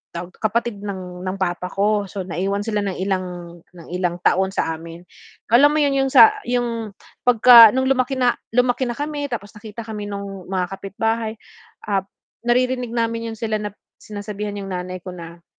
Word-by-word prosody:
tawag 175 +1 -6
kapatid 225 0 -1
ng 185 -3 -6
ng 185 - -2
papa 180 -1 -1
ko, 205 0 +1
so 195 0 -5
naiwan 190 +4 -2
sila 210 -1 -1
ng 195 -2 -3
ilang, 180 -3 -4
ng 170 -2 -15
ilang 180 -1 -1
taon 190 +2 +3
sa 165 - -1
amin. 165 +1 -11 0.5
Alam 280 +5 +7
mo - - +3
yun, 285 - +2
yung 270 - -2
sa 425 +6 +7
yung 230 -4 -2 0.3
'pagka, 235 -1 +9
nung 260 - +2
lumaki 265 0 +1
na 245 -1 +4 0.2
lumaki 250 +1 +2
na 240 - -3
kami, 290 0 -3
tapos 205 -4 -5
nakita 220 +1 -8
kami 210 -2 -6
nung 200 -2 -7
mga 185 -1 -2
kapitbahay, 220 +3 -2 0.5
ah, 200 -2 +2 0.5
naririnig 250 0 +1
namin 230 0 -1
yun - - -11
sila 215 -2 -1
na 210 0 -4 0.3
sinasabihan 205 0 -6
yung 195 -1 -6
nanay 180 0 -4
ko 185 - -7
na, 170 -1 -10
205 Hz, 175 wpm, -21 LUFS, 185-235 Hz, 0.5 s, pagka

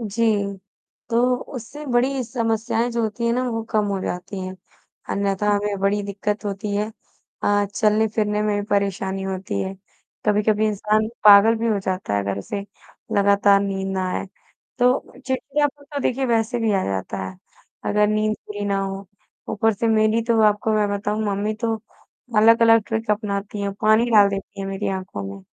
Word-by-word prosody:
जी। 210 -3 0 0.5
तो 245 +2 +3 0.2
उससे 260 +5 -8
बड़ी 255 +1 +1
समस्याएँ 230 0 -1
जो 235 0 -1
होती 220 +1 -2
हैं 235 - +2
ना 250 +2 0
वो 225 -1 -2
कम 215 -1 +2
हो 200 -1 -1
जाती 185 +2 -5
हैं। 185 0 -6 0.5
अन्यथा 200 +1 0
हमें 205 0 -1
बड़ी 205 +1 +1
दिक़्क़त 205 +2 -3
होती 200 0 -3
है। 210 +1 0 0.6
अ, 205 0 +3
चलने-फिरने 210 -1 +1
में 210 -1 +1
भी - - -4
परेशानी 195 -1 0
होती 190 - -3
है। 190 - -3 0.5
कभी-कभी 210 +1 +2
इंसान 215 +1 +1 0.2
पागल 210 +2 +8
भी 230 - -1
हो 215 -3 +2
जाता 185 - -2
है 100 - +1
अगर 100 0 -2
उसे 200 - -4 0.6
लगातार 200 0 +4
नींद 195 -1 -2
ना 190 -1 -1
आए। - - -3 0.5
तो 250 +1 +4 0.3
चिड़चिड़ापन 285 +2 -1
तो 285 - -1
देखिए 265 0 0
वैसे 230 0 +1
भी 225 -2 +1
आ 195 -1 +1
जाता 95 +1 -3
है। 95 0 -7 0.5
अगर 210 0 +3
नींद 215 0 +1
पूरी 205 -1 -5
ना 200 -1 0
हो। 195 0 -4 0.4
ऊपर 225 +2 +2
से 225 +3 0
मेरी 220 +1 +3
तो 230 -1 +2
आपको 210 +1 +3
मैं 210 -1 +2
बताऊँ 205 +1 -2
मम्मी 205 +1 -1
तो 230 -2 0 0.6
अलग-अलग 230 +1 +6
ट्रिक्स 220 -1 -2
अपनाती 205 -1 -2
हैं, 200 0 -2
पानी 215 +2 +4
डाल 205 -3 +7
देती 195 0 -6
हैं 195 - -3
मेरी 195 +1 -3
आँखों 185 - -4
में। 100 0 -7
210 Hz, 175 wpm, -22 LUFS, 200-225 Hz, 0.6 s, पागल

